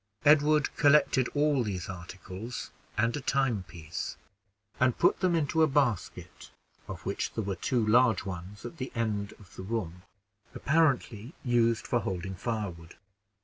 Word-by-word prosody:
Edward 150 0 +4
collected 145 -3 +4
all 145 -2 +3
these 95 -6 -3
articles, 95 +5 -7 0.3
and 115 +2 +2
a 145 - -3
timepiece, 100 - -2 0.6
and 125 -1 +3
put - - +3
them 185 -2 +2
into 160 0 +1
a 160 - +6
basket, 135 - -1 0.4
of - - -8
which - - -2
there 110 - -2
were 100 -1 -2
two 115 +6 0
large 115 -2 +4
ones 95 +3 -7
at 120 - -8
the 130 -2 -5
end 105 -3 -1
of 100 -3 -18
the - - -7
room, 95 -4 -4 0.5
apparently 140 -5 +1
used 115 -2 +2
for 120 - +1
holding 95 -2 -4
firewood. 95 -5 -4
115 Hz, 145 wpm, -29 LUFS, 95-135 Hz, 0.6 s, a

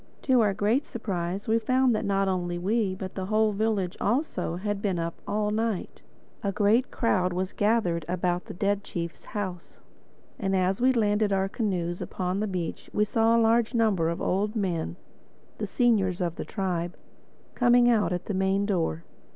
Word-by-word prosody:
To 255 -3 +4
our 205 -3 +2
great 225 +9 +2
surprise 190 -4 -3
we 225 +1 +3
found 255 +2 +2
that 215 - -1
not 195 0 +1
only 175 -2 -1
we, 195 +1 0
but 185 0 -6
the 190 -1 -4
whole 215 +1 +3
village 205 -3 0
also, 235 - 0
had 205 +2 -3
been 195 -4 0
up 165 0 -2
all 210 0 0
night. 220 -2 -2 0.4
A 200 - 0
great 215 +6 +2
crowd 185 -6 +1
was 185 +1 -2
gathered 205 -6 +1
about 180 0 -1
the - - -8
dead 200 +2 0
chief's 170 -4 -6
house. 185 -5 -6 0.6
And 195 -2 0
as 190 +3 +1
we 260 +1 +5
landed 210 -3 +2
our 195 0 +2
canoes 180 -5 -2
upon 185 +1 -2
the 215 - 0
beach 180 -4 -4
we 210 - +2
saw 225 +2 +3
a 230 - +4
large 230 +2 +2
number 205 -8 +2
of 170 - -3
old 205 +4 0
men, 175 -6 -1 0.6
the - - -2
seniors 205 -8 +2
of 175 -3 -1
the - - -5
tribe, 180 -3 -3 0.6
coming 245 0 +4
out 215 -7 +3
at 180 -1 -2
the 210 - -3
main 190 +1 +1
door. 165 - -1
200 Hz, 180 wpm, -27 LUFS, 180-220 Hz, 0.6 s, we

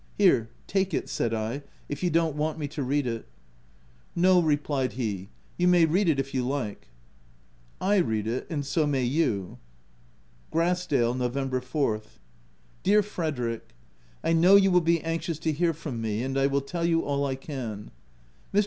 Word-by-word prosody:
Here, 115 0 +4 0.2
take 195 -1 0
it," - - -3
said 115 - -1
I, 110 0 -1
u - - -10 0.3
if 145 - -5
you 180 - +2
don't 165 -2 +1
want 155 +1 -1
me 150 -2 -3
to 150 0 -5
read 140 +2 0
it/' 115 -2 -3 0.5
" - - -32
No, 185 -1 +6
replied 145 -4 0
he, 105 -6 -3
" - - -33
you 180 - +3
may 175 -2 +6
read 175 +4 +2
it 145 -4 +2
if 135 0 -3
you 130 -2 0
like/' 125 -5 -3 0.9
I 205 +2 +2
read 110 - +1
it 115 +3 -2
and 145 -4 -2
so 150 +2 +1
may 135 -3 +1
you. 120 - 0 0.9
Grassdale, 165 -8 +1
Nov. 125 -1 -1
4th. 130 -4 -2 0.6
Dear 210 +2 +4
Frederick, 130 - -4 0.5
1 165 0 +2
know 185 +3 +7
you 195 -1 +6
will 180 0 +5
be 165 -1 +2
anxious 165 -1 -2
to 160 0 -1
hear 165 +3 +1
from 150 -7 -6
me: 110 +1 -1
and 135 +1 -3
I 135 0 +3
will 140 0 +1
tell 170 +5 -4
you 165 -1 +2
all 140 0 0
I 135 -2 -1
can. 125 -7 -6 0.6
Mr. 200 - +3
145 Hz, 185 wpm, -27 LUFS, 125-165 Hz, 0.9 s, know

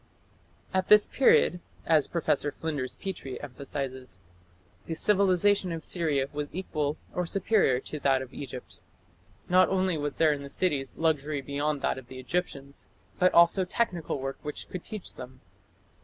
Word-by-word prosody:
"At 190 0 +1
this 210 0 +7
period", 215 -8 +4 0.3
as 155 -3 +4
Professor 145 -3 0
Flinders 145 -6 -4
Petrie 165 -9 -6
emphasizes, 130 -4 -6 0.7
"the 165 - -3
civilization 195 0 +3
of 165 -1 -4
Syria 150 -6 0
was 145 0 -3
equal 150 -5 -2 0.2
or 180 -1 -1
superior 195 - +2
to 150 - -6
that 135 -1 +2
of 130 - -13
Egypt." 130 -3 -8 0.7
Not 185 +1 +5
only 185 -4 +1
was 145 -1 -3
there 155 -2 +4
in 145 - -5
the 140 - -8
cities 140 -4 -1
"luxury 155 -2 0
beyond 145 +1 -2
that - - 0
of 125 - -15
the 130 - -10
Egyptians", 140 -1 -4 0.3
but 180 0 +5
also 170 +3 +6
"technical 180 -6 -1
work 135 +1 -4
which 150 - -6
could 185 - -6
teach 215 -4 -6
them". 130 0 -10
150 Hz, 155 wpm, -28 LUFS, 135-180 Hz, 0.7 s, this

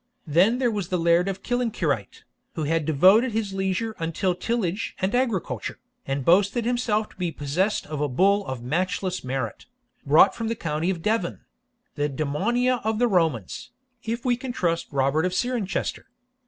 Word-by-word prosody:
Then 180 +10 +3
there 250 -2 +1
was 205 -5 -3
the 180 - 0
Laird 170 +2 +3
of 195 -1 -4
Killancureit, 200 - -1 0.3
who 160 - -2
had 160 +1 0
devoted 190 - +5
his 215 -3 -2
leisure 195 +3 -1
UNTILL 165 +3 0
tillage 200 0 -2
and 190 +2 0
agriculture, 245 - -1 0.3
and 135 -1 -2
boasted 200 +6 +3
himself 230 -3 0
to - - -20
be 175 -2 -2
possessed 165 +9 -1
of 150 -1 -5
a 150 - +1
bull 200 +10 +3
of 130 -2 -5
matchless 185 +6 -1
merit, 130 -4 -4 0.4
brought 155 +7 +6
from 230 - -4
the 230 - -1
county 165 -3 -2
of 175 -4 -3
Devon 195 - -1 0.5
(the 145 0 -1
Damnonia 220 - 0
of 220 0 0
the 245 +2 +3
Romans, 160 - 0 0.3
if 230 +2 -4
we 245 -1 +3
can 255 +1 -5
trust 170 -8 -1
Robert 140 +3 +1
of 180 0 -1
Cirencester). 240 -4 -2
185 Hz, 170 wpm, -25 LUFS, 155-225 Hz, 0.5 s, brought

